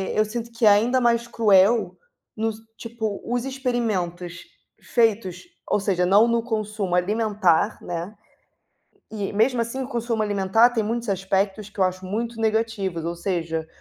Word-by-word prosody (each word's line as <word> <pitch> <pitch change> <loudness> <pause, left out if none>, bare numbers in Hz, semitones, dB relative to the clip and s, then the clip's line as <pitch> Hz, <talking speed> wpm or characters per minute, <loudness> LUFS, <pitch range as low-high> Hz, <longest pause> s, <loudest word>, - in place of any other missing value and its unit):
eu 215 - +4
sinto 230 +2 -5
que 230 0 0
é - - +9
ainda 230 +6 +3
mais 235 -1 +2
cruel, 215 -1 +3 0.4
nos 220 0 -1 0.2
tipo 220 -3 -4
os 245 0 -1
experimentos 215 - -3 0.3
feitos, 220 -6 0 0.3
ou - - +2
seja 185 -3 +1
não 205 +5 +5
no 235 0 +2
consumo 215 -5 -2
alimentar, 205 0 +1
né, 175 +4 -5 1.0
e 205 -2 -4
mesmo 235 +4 +2
assim 235 +3 -3
o 255 - -6
consumo 235 -3 -1
alimentar 205 +3 +3
tem 230 -2 0
muitos 230 +1 -2
aspectos 195 +2 -1
que 210 - -22
eu - - +5
acho 185 0 -2
muito 225 +4 -4
negativos 220 -6 -1
ou 170 - -2
seja, 165 -3 -3
215 Hz, 150 wpm, -23 LUFS, 190-230 Hz, 1.0 s, é